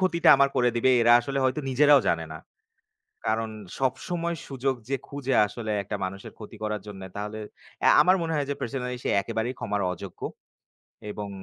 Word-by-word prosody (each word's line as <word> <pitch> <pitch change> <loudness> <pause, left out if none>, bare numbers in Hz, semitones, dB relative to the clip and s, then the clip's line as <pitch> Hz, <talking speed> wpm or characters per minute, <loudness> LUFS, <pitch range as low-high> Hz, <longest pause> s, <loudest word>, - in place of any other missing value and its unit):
ক্ষতিটা 180 -2 +2
আমার 140 0 +4
করে 125 -1 +4
দিবে? 130 +2 +3
এরা 120 +1 +6
আসলে 135 +2 -3
হয়তো 130 +3 +1
নিজেরাও 145 +2 +6
জানে 80 -1 0
না। 80 - -7 0.9
কারণ 110 0 0 0.3
সবসময় 170 +6 -1
সুযোগ 135 0 -1
যে 135 - +1
খুঁজে 135 -2 -3
আসলে 110 0 -5
একটা 95 - -4
মানুষের 95 +1 -7
ক্ষতি 105 - -10
করার 105 -2 -2
জন্যে 95 -2 -8
তাহলে 105 +1 -5 0.5
আ - - +8
আমার 185 +1 +5
মনে 165 -1 -2
হয় 145 - 0
যে - - -2
পার্সোনালি 125 0 -3
সে - - -1
একেবারেই 115 +3 -3
ক্ষমার 105 -1 -2
অযোগ্য। 95 +1 -10 0.9
এবং 105 -1 -6
125 Hz, 175 wpm, -26 LUFS, 105-140 Hz, 0.9 s, আ